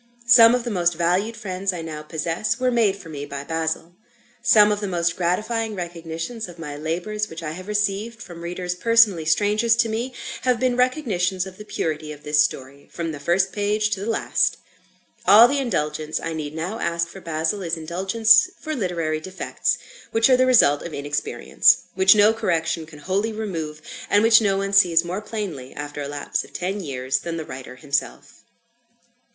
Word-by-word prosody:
Some 235 Hz, 0 st, +8 dB
of 250 Hz, -, -2 dB
the 240 Hz, -, -4 dB
most 175 Hz, -3 st, +1 dB
valued 180 Hz, +7 st, 0 dB
friends 195 Hz, -2 st, -2 dB
I 175 Hz, -2 st, -6 dB
now 155 Hz, -2 st, -6 dB
possess, 165 Hz, +8 st, -2 dB
were 255 Hz, 0 st, +1 dB
made 225 Hz, -5 st, +2 dB
for 195 Hz, -4 st, -13 dB
me 145 Hz, -3 st, -6 dB
by 140 Hz, -1 st, -6 dB
"Basil." 160 Hz, +2 st, -3 dB, 0.5 s
Some 215 Hz, -3 st, +6 dB
of 205 Hz, -, 0 dB
the 205 Hz, -, -3 dB
most 170 Hz, -2 st, 0 dB
gratifying 215 Hz, +5 st, -1 dB
recognitions 170 Hz, +5 st, -5 dB
of 175 Hz, -, -12 dB
my 150 Hz, -3 st, -7 dB
labours 175 Hz, +8 st, -3 dB
which 165 Hz, +1 st, -8 dB
I 155 Hz, -, -4 dB
have 185 Hz, +4 st, -9 dB
received, 210 Hz, +2 st, -1 dB
from 175 Hz, -8 st, -10 dB
readers 180 Hz, +1 st, -4 dB
personally 210 Hz, -4 st, +3 dB
strangers 210 Hz, +7 st, +2 dB
to 230 Hz, -1 st, +1 dB
me, 240 Hz, +4 st, -3 dB, 0.3 s
have 250 Hz, -2 st, +1 dB
been 255 Hz, -1 st, +1 dB
recognitions 205 Hz, -, 0 dB
of 190 Hz, -1 st, -11 dB
the 210 Hz, -, -9 dB
purity 155 Hz, -5 st, -3 dB
of 150 Hz, -1 st, -11 dB
this 150 Hz, 0 st, +3 dB
story, 140 Hz, 0 st, -6 dB
from 165 Hz, -1 st, -4 dB
the 145 Hz, -, -7 dB
first 185 Hz, +6 st, +1 dB
page 210 Hz, +1 st, 0 dB
to 205 Hz, -, -1 dB
the 205 Hz, +4 st, -4 dB
last. 225 Hz, -, +1 dB, 0.7 s
All 225 Hz, +3 st, +9 dB
the 280 Hz, +3 st, 0 dB
indulgence 155 Hz, -, -2 dB
I 165 Hz, -, -4 dB
need 155 Hz, -1 st, -5 dB
now 180 Hz, +8 st, -4 dB
ask 170 Hz, 0 st, -1 dB
for 190 Hz, +3 st, -12 dB
"Basil," 165 Hz, +4 st, -2 dB
is 170 Hz, -2 st, -2 dB
indulgence 195 Hz, -, +3 dB
for 310 Hz, -, -4 dB
literary 170 Hz, -, -2 dB
defects, 185 Hz, +4 st, -2 dB, 0.3 s
which 225 Hz, +3 st, +3 dB
are -, -, +7 dB
the 255 Hz, 0 st, +3 dB
result 145 Hz, -, +5 dB
of 170 Hz, -, -7 dB
inexperience; 145 Hz, +1 st, +2 dB, 0.2 s
which 190 Hz, +2 st, +6 dB
no 210 Hz, +1 st, +5 dB
correction 165 Hz, -5 st, -1 dB
can 155 Hz, -1 st, -13 dB
wholly 190 Hz, +8 st, -1 dB
remove; 165 Hz, -8 st, -5 dB, 0.3 s
and 205 Hz, +1 st, +4 dB
which 225 Hz, 0 st, +6 dB
no 195 Hz, -2 st, +1 dB
one 195 Hz, 0 st, -2 dB
sees 175 Hz, -4 st, +5 dB
more 180 Hz, +4 st, -4 dB
plainly, 200 Hz, -, -6 dB
after 145 Hz, 0 st, -6 dB
a 140 Hz, -, -4 dB
lapse 145 Hz, 0 st, -3 dB
of -, -, -16 dB
ten 190 Hz, +3 st, -3 dB
years, 130 Hz, -6 st, -2 dB
than 170 Hz, -1 st, -5 dB
the 160 Hz, -, -5 dB
writer 130 Hz, -2 st, -9 dB
himself. 140 Hz, +2 st, -4 dB
180 Hz, 190 wpm, -22 LUFS, 160-215 Hz, 0.7 s, All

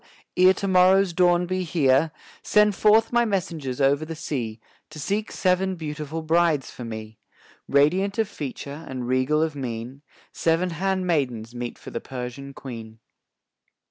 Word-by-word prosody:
ere 185 Hz, +1 st, +7 dB
to 195 Hz, +1 st, -2 dB
morrow's 185 Hz, 0 st, +4 dB
dawn 175 Hz, 0 st, +3 dB
be 185 Hz, +1 st, -2 dB
here, 155 Hz, -3 st, +2 dB, 0.3 s
"Send 210 Hz, 0 st, +4 dB
forth 220 Hz, +3 st, +4 dB
my 240 Hz, 0 st, +4 dB
messengers 165 Hz, -, -2 dB
over 140 Hz, +2 st, +3 dB
the 160 Hz, +1 st, -6 dB
sea, 120 Hz, -8 st, -4 dB, 0.3 s
To 155 Hz, -1 st, -10 dB
seek 205 Hz, +8 st, -2 dB
seven 185 Hz, 0 st, +1 dB
beautiful 155 Hz, -1 st, -5 dB
brides 160 Hz, -3 st, +2 dB
for 125 Hz, -, -9 dB
me; 110 Hz, -1 st, -7 dB, 0.5 s
"Radiant 180 Hz, +9 st, +2 dB
of 220 Hz, -2 st, +1 dB
feature 145 Hz, -3 st, -7 dB
and 130 Hz, -2 st, -4 dB
regal 130 Hz, +5 st, +2 dB
of 160 Hz, -2 st, -2 dB
mien, 125 Hz, 0 st, -5 dB, 0.3 s
Seven 170 Hz, +2 st, +1 dB
handmaids 165 Hz, -, -1 dB
meet 120 Hz, 0 st, -5 dB
for -, -, -11 dB
the 115 Hz, -, -4 dB
Persian 130 Hz, +2 st, -7 dB
Queen." 115 Hz, -4 st, -9 dB
155 Hz, 145 wpm, -24 LUFS, 130-185 Hz, 0.5 s, ere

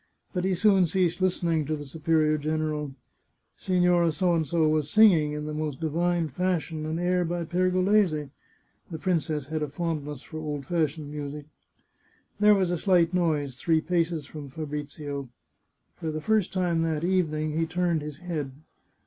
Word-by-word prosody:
But 180 Hz, -1 st, -1 dB
he 190 Hz, -1 st, +1 dB
soon 195 Hz, -1 st, +4 dB
ceased 180 Hz, +1 st, 0 dB
listening 170 Hz, -4 st, +1 dB
to 155 Hz, +2 st, -1 dB
the 145 Hz, -1 st, -7 dB
superior 155 Hz, +1 st, +1 dB
general. 150 Hz, -2 st, -2 dB, 0.6 s
Signora 180 Hz, -2 st, +2 dB
P 185 Hz, +5 st, -2 dB, 0.3 s
was 155 Hz, -2 st, +2 dB
singing, 175 Hz, -9 st, +5 dB
in 150 Hz, 0 st, -4 dB
the 150 Hz, -, -4 dB
most 150 Hz, -3 st, -3 dB
divine 170 Hz, +1 st, 0 dB
fashion, 160 Hz, 0 st, -2 dB
an 160 Hz, +1 st, -2 dB
air 180 Hz, +1 st, +1 dB
by 175 Hz, 0 st, -2 dB
Per 180 Hz, +3 st, +1 dB
golese 185 Hz, -6 st, +2 dB, 0.6 s
(the 165 Hz, -, -5 dB
princess 155 Hz, -4 st, -1 dB
had 155 Hz, +2 st, -3 dB
a 150 Hz, -, -1 dB
fondness 150 Hz, -4 st, -4 dB
for 155 Hz, -, -8 dB
old 150 Hz, -3 st, -4 dB
fashioned 155 Hz, -2 st, -1 dB
music). 145 Hz, 0 st, -6 dB, 0.9 s
There 210 Hz, 0 st, +6 dB
was 185 Hz, -3 st, +1 dB
a 175 Hz, -, -1 dB
slight 180 Hz, -3 st, +3 dB
noise 150 Hz, -7 st, 0 dB
three 160 Hz, +4 st, +2 dB
paces 165 Hz, -1 st, -1 dB
from 145 Hz, -1 st, -9 dB
Fabrizio. 145 Hz, -1 st, -5 dB, 0.7 s
For 160 Hz, -, -4 dB
the 155 Hz, 0 st, -3 dB
first 215 Hz, +2 st, +1 dB
time 175 Hz, -3 st, 0 dB
that 160 Hz, -1 st, -1 dB
evening 155 Hz, -4 st, 0 dB
he 165 Hz, 0 st, 0 dB
turned 175 Hz, -1 st, 0 dB
his 150 Hz, -1 st, -7 dB
head. 155 Hz, -6 st, -4 dB
160 Hz, 160 wpm, -27 LUFS, 150-175 Hz, 0.9 s, There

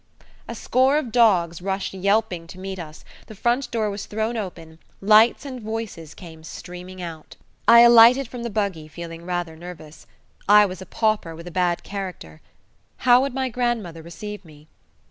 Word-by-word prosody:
A -, -, -6 dB
score 260 Hz, +3 st, +2 dB
of 260 Hz, -7 st, -3 dB
dogs 180 Hz, -8 st, +3 dB
rushed 195 Hz, +1 st, -3 dB
yelping 190 Hz, -3 st, 0 dB
to 180 Hz, -, -12 dB
meet 190 Hz, 0 st, -6 dB
us, 155 Hz, -2 st, -10 dB, 0.2 s
the 220 Hz, -, -11 dB
front 240 Hz, +5 st, 0 dB
door 220 Hz, -3 st, -1 dB
was 200 Hz, 0 st, -6 dB
thrown 220 Hz, +2 st, -2 dB
open, 165 Hz, -6 st, -7 dB, 0.2 s
lights 215 Hz, +6 st, +4 dB
and 255 Hz, -3 st, -7 dB
voices 215 Hz, -8 st, -6 dB
came 160 Hz, -3 st, -12 dB
streaming 180 Hz, +2 st, -9 dB
out. 160 Hz, -2 st, -9 dB, 0.3 s
I 235 Hz, 0 st, +9 dB
alighted 240 Hz, +2 st, +7 dB
from 245 Hz, 0 st, -8 dB
the 235 Hz, -, -4 dB
buggy 200 Hz, -7 st, -2 dB
feeling 165 Hz, +1 st, -9 dB
rather 175 Hz, -2 st, -3 dB
nervous. 160 Hz, -2 st, -12 dB, 0.4 s
I 210 Hz, 0 st, +8 dB
was 190 Hz, -1 st, -6 dB
a 190 Hz, -, -10 dB
pauper 215 Hz, -8 st, -1 dB
with 170 Hz, +1 st, -11 dB
a 175 Hz, -, -8 dB
bad 175 Hz, -1 st, 0 dB
character. 185 Hz, -, -7 dB, 0.6 s
How 245 Hz, 0 st, +7 dB
would 270 Hz, -1 st, -3 dB
my 265 Hz, -1 st, -1 dB
grandmother 230 Hz, -9 st, -2 dB
receive 205 Hz, +5 st, -8 dB
me? 155 Hz, -2 st, -17 dB
195 Hz, 170 wpm, -23 LUFS, 170-230 Hz, 0.6 s, I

